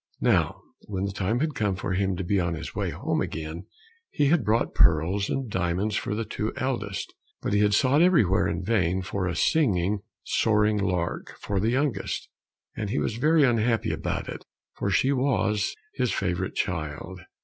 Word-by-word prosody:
Now - - +2 0.3
when 95 -2 -3
the 100 - -2
time 100 +6 -1
had 155 -1 0
come 105 -6 0
for 95 0 -4
him 95 0 +1
to 95 - -3
be 100 +3 +1
on 85 -2 0
his 80 - -7
way - - -1
home - - -1
again, 80 +2 -5 0.4
he 145 -2 +2
had 165 -4 +3
brought 110 +3 +1
pearls 85 +5 +3
and 135 -2 -2
diamonds 95 +1 -1
for 105 - -1
the 115 +1 -2
two 105 +1 -3
eldest, 115 -7 -3 0.3
but - - -2
he 105 - +3
had 105 0 +4
sought 135 +6 +4
everywhere 135 - +4
in 85 +3 -2
vain 95 -3 +1
for 95 0 -2
a 90 - -2
singing, 100 - +2 0.2
soaring 105 -1 +2
lark 90 -3 -2
for 100 -1 -2
the 110 +4 +1
youngest, 135 +2 -1 0.5
and 105 - -3
he 125 - -1
was 115 - -1
very 155 +4 +4
unhappy 115 -2 +2
about - - -3
it, - - -7 0.3
for 100 - -2
she 100 +8 +3
was 125 -6 +1 0.2
his 125 -3 0
favorite 90 -1 -2
child. 85 +1 -3
100 Hz, 180 wpm, -26 LUFS, 90-115 Hz, 0.5 s, had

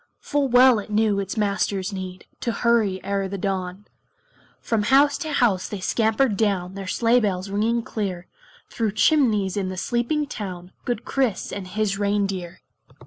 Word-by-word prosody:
Full 290 -1 0
well 250 -1 +6
it 205 - -8
knew 210 -1 +2
its 195 +2 -4
Master's 200 -1 0
need 185 -1 -7
To 235 - -1
hurry 225 -5 +1
e'er 200 0 -1
the 200 +1 -5
dawn. 190 0 -3 0.7
From 225 -2 0
house 275 +6 +4
to 315 - -4
house 230 -10 +1
they 205 - -5
scampered 220 +4 +1
down, 195 -3 0
Their 195 -1 -7
sleigh 235 +5 +3
bells 195 -3 -2
ringing 225 +3 +1
clear, 190 -6 -4 0.4
Through 220 -3 -2
chimneys 215 - +3
in 195 -2 -1
the 185 - -6
sleepy 240 - 0
town 185 -8 -7
Good 240 -2 -2
Kris 260 -7 -1
and 195 -2 -5
his 205 +1 -1
reindeer. 195 -3 -1
205 Hz, 160 wpm, -23 LUFS, 190-235 Hz, 0.7 s, well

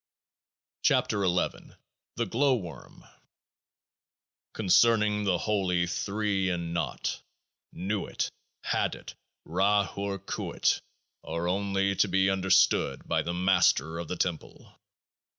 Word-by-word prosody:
18 - - +4
KEOAAH 95 -4 +1
IA - - -17 0.4
THE 120 - -1
GLOW 130 +6 +2
WORM 90 -8 -9 1.5
Concerning 105 0 +3
the 95 -3 +2
Holy 90 -3 0
Three 100 +1 -1
in 85 -2 -3
Naught. 85 - -3 0.5
Nuit, 100 +1 -3 0.3
Hadit, - - -2 0.3
Ra 100 +4 +2
Hoor 100 +2 -4
Khuit, 95 - -1 0.4
are 85 +1 -3
only 100 +1 0
to - - +4
be 95 +1 +2
understood 95 -1 +2
by - - +1
the 85 +1 -3
Master 90 -4 +2
of 85 - -5
the 90 - -4
Temple. 85 -3 -4
95 Hz, 110 wpm, -28 LUFS, 90-105 Hz, 1.5 s, 18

